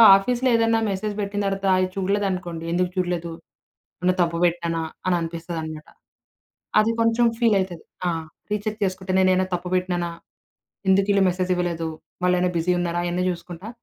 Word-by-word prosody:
ఆఫీస్‌లో 250 +6 +1
ఏదన్నా 225 0 +3
మెసేజ్ 205 +2 -2
బెట్టిన 205 0 -2
తర్వాత 195 0 -1
అది 185 - +2
చూడలేదనుకోండి. 185 -4 -1
ఎందుకు 180 +1 +1
చూడలేదు? 175 -2 -1 0.7
ఏమన్న 180 0 +3
తప్పు 170 -1 +1
బెట్టానా? 170 -1 0 0.3
అననిపిస్తదనమాట. 165 -2 -3 0.9
అది 220 +1 +2
కొంచెం 230 +1 +3
ఫీలైతది. 195 -7 +1 0.2
ఆ! - - +3 0.4
రీచెక్ 210 +1 -2
చేసుకుంటే 190 0 -2
నేనేమైనా 185 0 +4
తప్పు 180 0 -2
బెట్టినానా? 180 -1 0 0.8
ఎందుకీళ్ళు 195 +1 +4
మెసేజ్ 185 0 -1
ఇవ్వలేదు? 170 -2 -1 0.4
వాళ్ళైనా 180 0 +3
బిజీ 175 +2 +2
ఉన్నారా? 175 0 -1
అయన్నీ 175 +1 -1
జూసుకుంటా. 175 +3 -6
180 Hz, 130 wpm, -24 LUFS, 175-195 Hz, 0.9 s, నేనేమైనా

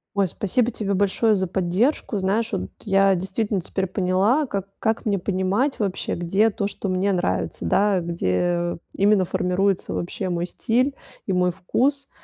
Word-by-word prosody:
Ой, 200 -1 +2
спасибо 215 +7 0
тебе 205 -4 -2
большое 205 +3 +2
за 190 -2 0
поддержку. 195 - 0
Знаешь, 205 +4 0
вот 195 -4 -3
я 195 -2 +3
действительно 190 +2 -1
теперь 190 +2 -2
поняла, 195 - +2
как 200 -6 -4
как 220 0 -1
мне 200 -1 +2
понимать 195 +8 0
вообще, 200 -4 -1
где 195 +6 +2
то, 200 -1 -2
что 200 - -5
мне 185 +2 +1
нравится, 95 - -1
да. 195 - +3
Где 170 - -1 0.2
именно 200 -1 +3
формируется 185 +2 0
вообще 185 +2 -3
мой 175 -1 -1
стиль 250 +9 0 0.3
и 195 - -1
мой 180 0 +2
вкус. 270 +10 -1
195 Hz, 155 wpm, -23 LUFS, 180-210 Hz, 0.3 s, я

